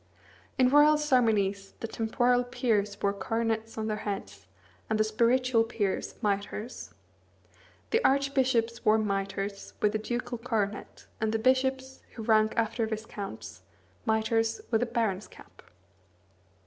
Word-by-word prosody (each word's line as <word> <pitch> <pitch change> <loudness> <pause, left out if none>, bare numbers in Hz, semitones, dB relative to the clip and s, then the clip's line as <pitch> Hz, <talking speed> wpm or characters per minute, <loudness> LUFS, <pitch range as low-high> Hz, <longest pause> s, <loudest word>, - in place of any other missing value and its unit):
In 255 -1 +5
royal 295 +2 +6
ceremonies 220 -9 +1
the 225 - -4
temporal 245 +3 +1
peers 210 -5 -1
wore 200 0 +2
coronets 225 +1 -2
on 220 - -2
their 215 -1 -1
heads, 100 - -6 0.4
and 220 0 0
the - - +5
spiritual 235 +2 +2
peers, 210 -4 -2
mitres. 210 +3 -3 1.0
The 455 +2 +2
archbishops 260 -4 +2
wore 215 +1 +5
mitres, 200 -1 -3
with 210 0 +2
a 215 - 0
ducal 240 +2 -4
coronet; 215 -4 -3 0.2
and 220 0 +1
the 225 - +1
bishops, 260 +2 +1
who 225 - -6
rank 215 0 +3
after 225 0 0
viscounts, 215 -2 -6 0.5
mitres, 225 +1 +1
with 225 -1 +2
a 245 - +1
baron's 220 -4 -1
cap. - - -17
225 Hz, 130 wpm, -29 LUFS, 210-245 Hz, 1.0 s, royal